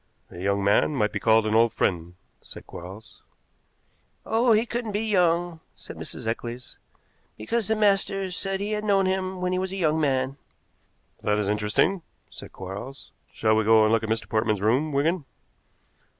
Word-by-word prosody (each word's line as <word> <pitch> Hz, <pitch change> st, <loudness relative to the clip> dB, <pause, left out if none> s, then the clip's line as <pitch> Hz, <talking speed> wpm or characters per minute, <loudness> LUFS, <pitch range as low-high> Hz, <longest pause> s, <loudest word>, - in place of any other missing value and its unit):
"A 90 Hz, -, -10 dB
young 100 Hz, +2 st, 0 dB
man 105 Hz, +9 st, +3 dB
might 105 Hz, -5 st, +1 dB
be -, -, -3 dB
called 110 Hz, -1 st, +4 dB
an 110 Hz, -, 0 dB
old 115 Hz, +1 st, +4 dB
friend," 85 Hz, -2 st, -1 dB, 0.3 s
said -, -, -12 dB
Quarles. 95 Hz, +6 st, -11 dB, 1.0 s
"Oh, 230 Hz, +2 st, +2 dB
he 220 Hz, +1 st, +4 dB
couldn't 235 Hz, -2 st, -4 dB
be 210 Hz, +2 st, -1 dB
young," 175 Hz, -4 st, +1 dB, 0.2 s
said -, -, -11 dB
Mrs. -, -, -6 dB
Eccles, 120 Hz, +2 st, -5 dB, 0.6 s
"because 210 Hz, -, -2 dB
the 220 Hz, -, +1 dB
master 195 Hz, -2 st, +1 dB
said 195 Hz, +1 st, -3 dB
he 205 Hz, +1 st, -2 dB
had 210 Hz, 0 st, -2 dB
known 200 Hz, -2 st, +2 dB
him 185 Hz, 0 st, -2 dB
when 180 Hz, 0 st, 0 dB
he 185 Hz, -, 0 dB
was 190 Hz, 0 st, -3 dB
a -, -, -4 dB
young 160 Hz, -3 st, +1 dB
man." 135 Hz, -1 st, 0 dB, 0.8 s
"That 105 Hz, 0 st, +1 dB
is 105 Hz, -2 st, -1 dB
interesting," 105 Hz, -, +1 dB, 0.3 s
said -, -, -11 dB
Quarles. 100 Hz, +9 st, -8 dB, 0.2 s
"Shall 110 Hz, 0 st, +1 dB
we 110 Hz, -, +2 dB
go 110 Hz, 0 st, +5 dB
and 110 Hz, -, +3 dB
look 115 Hz, -, +3 dB
at 110 Hz, -, -5 dB
Mr. 110 Hz, 0 st, -1 dB
Portman's 110 Hz, -1 st, 0 dB
room, 130 Hz, +8 st, +2 dB
Wigan?" 155 Hz, +4 st, 0 dB
140 Hz, 180 wpm, -25 LUFS, -, 1.0 s, go